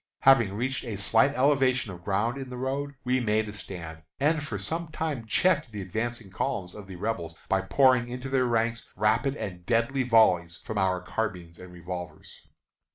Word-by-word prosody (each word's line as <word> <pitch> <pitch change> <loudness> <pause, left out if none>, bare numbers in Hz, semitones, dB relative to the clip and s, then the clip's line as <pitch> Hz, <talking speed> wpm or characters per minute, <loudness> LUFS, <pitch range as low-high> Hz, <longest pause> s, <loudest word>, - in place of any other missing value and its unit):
Having 120 -8 +5
reached 130 +5 -2
a 115 -5 -4
slight 115 +8 +3
elevation 130 -4 +2
of 85 -1 -10
ground 105 +6 0
in 135 -1 -6
the 125 - -6
road, 140 +2 -3
we 125 +1 +1
made 110 -2 +1
a 105 - -6
stand, 85 -5 -8 0.2
and 150 +2 +2
for 135 -8 -4
some 165 - -2
time 155 -6 -3
checked 155 -1 +2
the 105 - -6
advancing 110 +2 -4
columns 90 -1 -2
of 105 -2 -10
the 95 - -8
Rebels 90 -4 -3
by 95 - +2
pouring 125 +3 +3
into 125 +2 -5
their 130 -1 +2
ranks 115 0 0
rapid 115 +7 +2
and 90 -9 -6
deadly 115 +7 +1
volleys 95 -9 +4
from 110 -3 -3
our 95 -1 +1
carbines 90 -5 -4
and 90 0 -11
revolvers. 90 0 -8
115 Hz, 180 wpm, -27 LUFS, 95-130 Hz, 0.2 s, Having